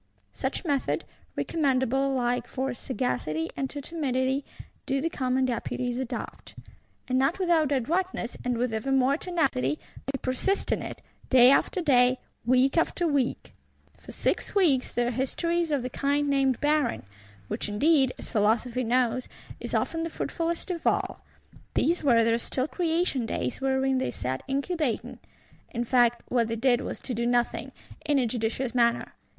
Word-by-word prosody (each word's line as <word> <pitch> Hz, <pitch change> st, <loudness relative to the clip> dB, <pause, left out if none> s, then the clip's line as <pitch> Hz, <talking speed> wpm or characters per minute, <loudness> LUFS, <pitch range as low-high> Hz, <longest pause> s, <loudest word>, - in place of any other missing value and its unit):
Such 265 Hz, +7 st, -3 dB
method, 285 Hz, -4 st, 0 dB, 0.3 s
recommendable 270 Hz, -3 st, +1 dB
alike 245 Hz, -2 st, -1 dB
to 265 Hz, 0 st, -2 dB
sagacity 160 Hz, -, -2 dB
and 270 Hz, -1 st, -2 dB
to 290 Hz, -, -6 dB
timidity, 270 Hz, -3 st, -1 dB, 0.4 s
do 275 Hz, 0 st, +1 dB
the 330 Hz, +4 st, -1 dB
Commons 260 Hz, -2 st, +1 dB
Deputies 245 Hz, +1 st, -2 dB
adopt; 260 Hz, -2 st, -6 dB, 0.5 s
and, 255 Hz, 0 st, +1 dB
not 270 Hz, +6 st, +2 dB
without 335 Hz, -6 st, +2 dB
adroitness, 285 Hz, 0 st, -1 dB
and 245 Hz, -1 st, 0 dB
with 245 Hz, -1 st, -1 dB
ever 220 Hz, +5 st, -2 dB
more 270 Hz, +1 st, +3 dB
tenacity, 290 Hz, -, 0 dB, 0.3 s
they 275 Hz, 0 st, -2 dB
persist 265 Hz, +10 st, 0 dB
in -, -, +1 dB
it, -, -, -7 dB, 0.3 s
day 255 Hz, -1 st, +7 dB
after 365 Hz, +6 st, +2 dB
day, 255 Hz, -5 st, +4 dB, 0.3 s
week 255 Hz, +5 st, +3 dB
after 345 Hz, +1 st, 0 dB
week. 280 Hz, -5 st, -1 dB, 0.5 s
For -, -, -11 dB
six -, -, -1 dB
weeks 305 Hz, -10 st, +3 dB
their 240 Hz, 0 st, 0 dB
history 335 Hz, +8 st, 0 dB
is 335 Hz, -, -2 dB
of 285 Hz, -4 st, 0 dB
the 250 Hz, -, -3 dB
kind 285 Hz, +2 st, 0 dB
named 270 Hz, -3 st, +2 dB
barren; 295 Hz, -4 st, +1 dB, 0.4 s
which -, -, -3 dB
indeed, 270 Hz, +4 st, +3 dB
as -, -, -9 dB
Philosophy 230 Hz, +4 st, +1 dB
knows, 250 Hz, +1 st, +1 dB, 0.3 s
is -, -, -4 dB
often 330 Hz, -, 0 dB
the 330 Hz, -, -2 dB
fruitfulest 335 Hz, +2 st, -3 dB
of 340 Hz, -2 st, -3 dB
all. -, -, 0 dB, 0.5 s
These 340 Hz, +1 st, +2 dB
were 235 Hz, -5 st, +5 dB
their 230 Hz, +1 st, +2 dB
still 255 Hz, +3 st, -1 dB
creation 325 Hz, -8 st, 0 dB
days; 125 Hz, -, -3 dB
wherein 265 Hz, 0 st, +1 dB
they 260 Hz, -, -1 dB
sat 130 Hz, +1 st, -3 dB
incubating! 280 Hz, -1 st, -2 dB, 0.5 s
In 240 Hz, -1 st, -2 dB
fact, 240 Hz, -1 st, +3 dB
what 235 Hz, -2 st, +2 dB
they 230 Hz, -, -2 dB
did 245 Hz, +1 st, +2 dB
was -, -, -5 dB
to 255 Hz, -, -3 dB
do 235 Hz, +1 st, -1 dB
nothing, 240 Hz, 0 st, 0 dB, 0.3 s
in 295 Hz, -2 st, +2 dB
a 260 Hz, -, +3 dB
judicious 235 Hz, +2 st, -2 dB
manner. 235 Hz, -1 st, +2 dB
260 Hz, 160 wpm, -27 LUFS, 240-290 Hz, 0.5 s, day